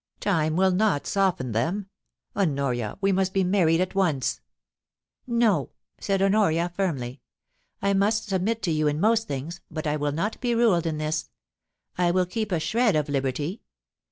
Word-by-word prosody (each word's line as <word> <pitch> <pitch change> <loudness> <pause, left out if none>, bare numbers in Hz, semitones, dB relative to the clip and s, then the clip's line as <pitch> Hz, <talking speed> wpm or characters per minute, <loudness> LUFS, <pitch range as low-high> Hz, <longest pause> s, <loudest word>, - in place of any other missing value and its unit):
Time 160 -5 +1
will 190 +1 +3
not 190 -5 +1
soften 185 -11 0
them. 165 - -1 0.5
Honoria, 140 - -1
we 195 0 +3
must 190 0 0
be 195 - +3
married 180 -3 +3
at 185 0 -1
once' 165 -9 0 0.4
* - - -67
No,' 225 - +2 0.3
said 195 -1 0
Honoria, 195 -4 +2
firmly. 135 -10 -2 0.3
* - - -46
I 200 0 +2
must 215 +3 +1
submit 205 +4 -1
to 175 - +1
you 155 -1 +1
in 150 +1 0
most 225 +3 +2
things, 155 +6 -5
but 155 -1 -5
I 150 0 0
will 145 0 -1
not 190 +9 -3
be 240 -2 +1
ruled 200 -8 +3
in 155 -2 -2
this. 155 0 -2 0.7
I 175 -1 +3
will 180 +1 +2
keep 215 +3 -3
a 175 - +1
shred 225 +4 +2
of 150 -1 0
liberty. 145 - -2
180 Hz, 175 wpm, -25 LUFS, 150-200 Hz, 0.7 s, will